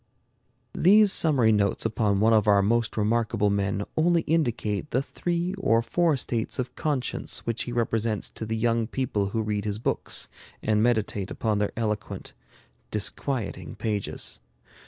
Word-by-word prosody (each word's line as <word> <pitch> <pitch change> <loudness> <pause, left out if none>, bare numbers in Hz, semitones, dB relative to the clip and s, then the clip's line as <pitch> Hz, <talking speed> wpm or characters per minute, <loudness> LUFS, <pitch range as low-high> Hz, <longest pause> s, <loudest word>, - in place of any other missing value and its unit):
These 205 +3 +6
summary 135 -9 +4
notes 100 -1 +1
upon 105 -3 +1
one 110 +1 +4
of 110 -1 +3
our 100 -1 +5
most 115 +2 +1
remarkable 110 -1 +1
men 100 0 0
only 170 +1 +3
indicate 125 -7 -1
the 130 -1 0
three 175 +4 -2
or 115 -11 +2
four 160 +5 +1
states 115 -2 -2
of 130 -1 -3
conscience 145 -5 -2
which 115 0 -2
he 120 - -5
represents 115 -2 -1
to 110 - -6
the 110 +1 -2
young 115 0 +1
people 115 -6 -1
who 110 +3 -2
read 105 -1 -2
his 105 -1 -2
books 110 - -2 0.4
and 105 -1 +2
meditate 110 -4 0
upon 110 -2 -1
their 105 - 0
eloquent, 105 -2 -3 0.6
disquieting 110 +2 -3
pages. 105 -3 -2
115 Hz, 150 wpm, -26 LUFS, 105-125 Hz, 0.6 s, These